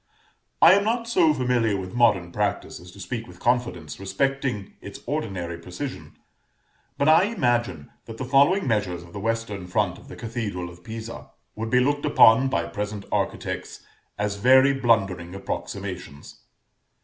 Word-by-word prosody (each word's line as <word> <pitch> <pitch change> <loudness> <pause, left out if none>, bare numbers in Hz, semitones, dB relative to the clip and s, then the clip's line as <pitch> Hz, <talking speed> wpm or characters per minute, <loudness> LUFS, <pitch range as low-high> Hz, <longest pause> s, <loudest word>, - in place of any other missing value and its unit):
I 165 - +10
am 200 +1 +3
not 230 +2 -1
so 180 -9 +4
familiar 125 -6 +1
with 90 -1 -6
modern 105 -8 +3
practice 105 +1 -2
as 90 - -13
to - - -14
speak 115 +4 -5
with - - -14
confidence 115 - -1
respecting 130 +1 -2
its 100 - -9
ordinary 95 - -3
precision; 110 +11 -7 0.8
but 140 - +1
I 160 +4 +6
imagine 120 - -1
that 115 - -9
the 130 - -4
following 140 +9 +4
measures 100 -7 -1
of 85 - -16
the 100 - -6
western 110 -3 -3
front 95 -1 0
of - - -17
the - - -10
cathedral 105 -7 -4
of 85 0 -16
Pisa, 115 +2 -8 0.3
would 110 +1 -4
be 125 - +4
looked 145 +3 +1
upon 115 +4 +6
by - - 0
present 105 -1 -5
architects - - -3 0.3
as 105 -1 -2
very 130 +5 +6
blundering 95 -9 +1
approximations. 70 -6 -6
115 Hz, 155 wpm, -24 LUFS, 95-130 Hz, 0.8 s, I